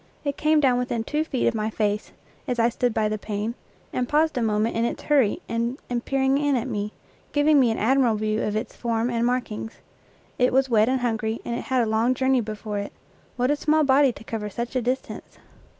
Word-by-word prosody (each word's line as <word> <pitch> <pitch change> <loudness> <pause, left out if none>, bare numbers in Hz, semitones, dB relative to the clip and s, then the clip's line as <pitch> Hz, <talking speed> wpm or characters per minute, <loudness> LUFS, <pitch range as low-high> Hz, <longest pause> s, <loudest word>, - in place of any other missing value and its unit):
It 285 -1 -1
came 310 0 +3
down 255 -4 +3
within 240 -2 -2
two 300 +6 -1
feet 270 -6 -2
of - - +2
my 215 -1 -1
face, 210 -1 -1 0.4
as 250 -2 -1
I 230 0 +3
stood 245 +1 0
by 220 -1 +1
the 215 0 -2
pane, 210 +2 -3 0.4
and 250 -1 -1
paused 310 +2 +2
a 250 - 0
moment 215 0 +1
in 230 - +1
its 235 - -2
hurry 275 -8 +2
and 235 +3 -1 0.3
peered 270 0 +2
in 290 -1 +2
at 245 +1 -1
me, 210 -3 -3 0.4
giving 290 0 +4
me 250 -3 +4
an 225 - -1
admirable 240 -1 +3
view 215 +1 -1
of 210 - -1
its 220 +2 -3
form 235 0 -1
and 235 -1 0
markings. 240 -3 -2 0.7
It 250 0 +3
was 265 0 +3
wet 220 +1 +4
and 260 -1 0
hungry, 225 -1 -1
and 235 - -3
it - - -5
had 260 -4 +2
a - - 0
long 225 +3 +1
journey 260 -1 +2
before 215 -1 -4
it. 200 - -6 0.4
What 250 +2 +1
a - - +3
small 310 +1 +2
body 275 -1 +4
to 220 - -12
cover 220 -2 -4
such 235 +5 -5
a 255 - +2
distance! 250 +3 -4
240 Hz, 225 wpm, -24 LUFS, 220-265 Hz, 0.7 s, giving